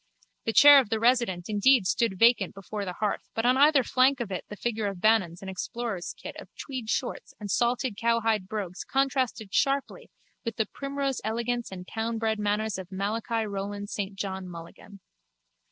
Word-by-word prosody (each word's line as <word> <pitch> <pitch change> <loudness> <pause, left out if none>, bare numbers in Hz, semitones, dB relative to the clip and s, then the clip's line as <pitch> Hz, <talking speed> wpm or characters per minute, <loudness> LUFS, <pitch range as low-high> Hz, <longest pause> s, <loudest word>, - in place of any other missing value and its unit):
The 225 - 0
chair 290 +2 +9
of 250 -6 -1
the 220 - 0
resident 230 -7 +2
indeed 215 +2 +4
stood 200 0 +1
vacant 230 -3 +4
before 200 +1 -5
the 180 - -4
hearth 210 +2 -3
but 225 - -1
on 250 +1 +5
either 285 0 +5
flank 260 +3 +3
of 230 -5 -4
it 185 - -4
the 210 - -6
figure 220 -1 -2
of 195 -3 -5
Bannon 215 -5 +3
in - - -7
explorer's 195 0 -4
kit - - -8
of - - -12
tweed 255 -6 -6
shorts 245 - -3
and 205 -2 -5
salted 240 -1 +1
cowhide 225 -4 +1
brogues 195 -4 -4
contrasted 260 -6 -1
sharply 275 0 0 0.3
with 230 -3 -4
the 220 - 0
primrose 275 +2 -3
elegance 235 +2 -2
and 180 -1 -8
townbred 225 -1 -2
manners 210 0 -1
of 190 0 -9
Malachi 220 +4 -2
Roland 205 0 -5
St 200 -1 -4
John 190 -2 -4
Mulligan. 170 +4 -11
220 Hz, 175 wpm, -27 LUFS, 195-240 Hz, 0.3 s, chair